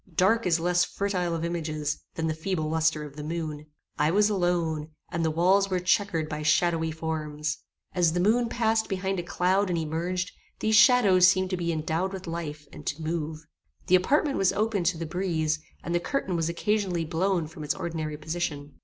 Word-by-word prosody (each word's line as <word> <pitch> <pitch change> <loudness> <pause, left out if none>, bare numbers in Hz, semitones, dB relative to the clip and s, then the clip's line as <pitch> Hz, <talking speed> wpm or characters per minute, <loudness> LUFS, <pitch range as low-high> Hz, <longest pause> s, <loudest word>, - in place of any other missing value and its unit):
Dark 200 +5 +3
is 170 -1 +3
less 175 +1 +2
fertile 180 -4 -1
of 165 0 -2
images 155 -3 -2 0.2
than 160 - -2
the 160 - 0
feeble 160 0 -2
lustre 160 -1 +1
of 145 -2 -10
the 150 - -5
moon. 155 -2 -4 0.3
I 150 - +3
was 210 +4 +3
alone, 170 -5 0 0.2
and 165 0 -1
the 160 - +2
walls 185 +5 +3
were 185 -1 +1
chequered 180 -3 +1
by 155 -1 -4
shadowy 160 +1 +2
forms. 155 -1 -3 0.3
As 170 -3 +2
the 175 - 0
moon 230 +5 +3
passed 225 -1 +1
behind 190 -1 -1
a - - 0
cloud 185 +3 +1
and 175 - 0
emerged, 170 +3 -2 0.3
these 220 - +1
shadows 205 -7 +7
seemed 185 0 +2
to - - +1
be 170 -1 -1
endowed 165 +4 -1
with 190 -1 -6
life, 155 -3 -5
and - - -10
to 145 - -2
move. 160 -1 -3 0.4
The 185 - +5
apartment 280 - +2
was 195 - +4
open 210 -2 0
to 170 0 +1
the 165 - -4
breeze, 160 -3 -1 0.2
and 170 - -3
the 175 - +3
curtain 185 -1 -2
was 165 -1 0
occasionally 185 -1 0
blown 175 +1 0
from 155 0 -9
its 150 - -1
ordinary 155 -3 -4
position. 150 -2 -4
170 Hz, 195 wpm, -27 LUFS, 160-190 Hz, 0.4 s, shadows